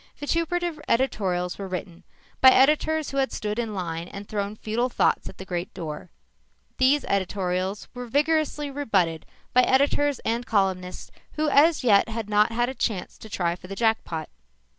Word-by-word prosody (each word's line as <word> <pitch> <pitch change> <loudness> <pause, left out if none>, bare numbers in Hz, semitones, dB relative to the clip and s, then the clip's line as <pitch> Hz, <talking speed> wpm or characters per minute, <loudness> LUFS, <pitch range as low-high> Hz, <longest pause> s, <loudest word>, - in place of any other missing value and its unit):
Vituperative 335 +1 -1
editorials 190 -8 0
were 195 - -4
written 180 -2 -6 0.4
by 260 - +10
editors 300 +3 +3
who 275 - -4
had 270 -1 +1
stood 210 +1 -3
in 225 -3 -3
line 170 -2 -4
and 200 +2 -9
thrown 205 0 -3
futile 225 +4 -1
thoughts - - +1
at - - -13
the 190 - -8
great 175 -1 -4
door. 155 +1 -6 0.7
These 265 +2 +4
editorials 190 0 -1
were 245 0 -7
vigorously 295 +2 +1
rebutted 195 - 0 0.3
by 250 - +6
editors 280 +2 +2
and 230 +2 0
columnists 190 -5 -1 0.2
who 310 0 0
as 290 +1 +4
yet 210 -3 +4
had 220 -2 -5
not 210 +2 +4
had 240 +1 +1
a 260 - -4
chance 205 -8 -3
to 220 - -11
try 175 -4 -1
for 185 - -13
the 195 - -6
jackpot. 220 -8 0
220 Hz, 165 wpm, -25 LUFS, 185-275 Hz, 0.7 s, by